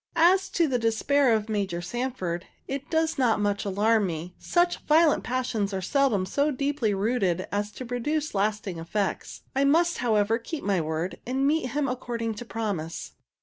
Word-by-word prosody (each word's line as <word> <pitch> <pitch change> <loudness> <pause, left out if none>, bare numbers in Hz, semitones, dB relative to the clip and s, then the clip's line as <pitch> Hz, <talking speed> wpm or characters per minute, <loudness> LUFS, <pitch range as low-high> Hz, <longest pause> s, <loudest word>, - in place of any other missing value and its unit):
As 370 +3 +4
to 335 -2 +3
the 255 -3 0
despair 235 +4 +2
of 215 -1 +1
Major 200 -5 -1
Sanford, 185 -4 -3 0.2
it 275 +1 -5
does 320 -2 +1
not 240 -5 +3
much 205 0 0
alarm 205 +1 +2
me. 170 +1 -5
Such 350 0 +1
violent 315 0 +4
passions 245 -6 -1
are 190 - -2
seldom 250 -5 +2
so 285 +10 +1
deeply 280 -4 0
rooted 195 -4 0
as 205 +1 -1
to 255 - -7
produce 290 +6 -2
lasting 205 -3 -1
effects. 190 +4 -3
I 270 - +3
must, 335 +5 +3
however, 225 -1 +2
keep 295 +6 -6
my 195 -3 +1
word, 160 +3 -3
and 265 +2 0
meet 300 -1 +2
him 285 +3 0
according 235 -3 -3
to 240 - -6
promise. 205 -9 -4
230 Hz, 170 wpm, -26 LUFS, 200-280 Hz, 0.2 s, As